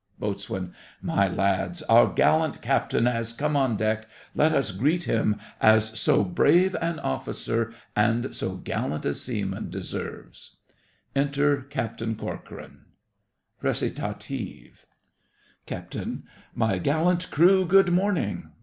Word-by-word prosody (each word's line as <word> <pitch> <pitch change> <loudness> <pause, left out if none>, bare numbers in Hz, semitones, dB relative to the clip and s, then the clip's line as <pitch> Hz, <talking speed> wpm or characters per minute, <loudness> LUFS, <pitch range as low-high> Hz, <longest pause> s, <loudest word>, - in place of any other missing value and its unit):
BOAT. 100 -1 -4 0.5
My 100 0 +1
lads, 100 - 0
our 115 -3 +6
gallant 160 0 +2
captain 120 -2 +1
has 115 -2 0
come 150 +5 -1
on 130 -6 +2
deck; 110 +1 -1 0.3
let 155 +1 +3
us 135 -8 +1
greet 150 - +1
him 105 -5 +1 0.2
as 110 0 +4
so - - +3
brave 175 - +3
an 165 -1 -1
officer 115 +11 -2 0.2
and 115 +3 +1
so - - -3
gallant 75 +1 -3
a 70 - +1
seaman - - -4
deserves. - - -7 0.6
Enter 145 +1 +2
CAPTAIN 115 -4 -4
CORCORAN - - -8 0.8
RECITATIVE - - -4 0.8
CAPT. - - -6 0.6
My 110 -5 +1
gallant 170 - +1
crew, 185 +5 +5
good 195 0 +5
morning. 180 - 0
120 Hz, 115 wpm, -26 LUFS, 110-160 Hz, 0.8 s, our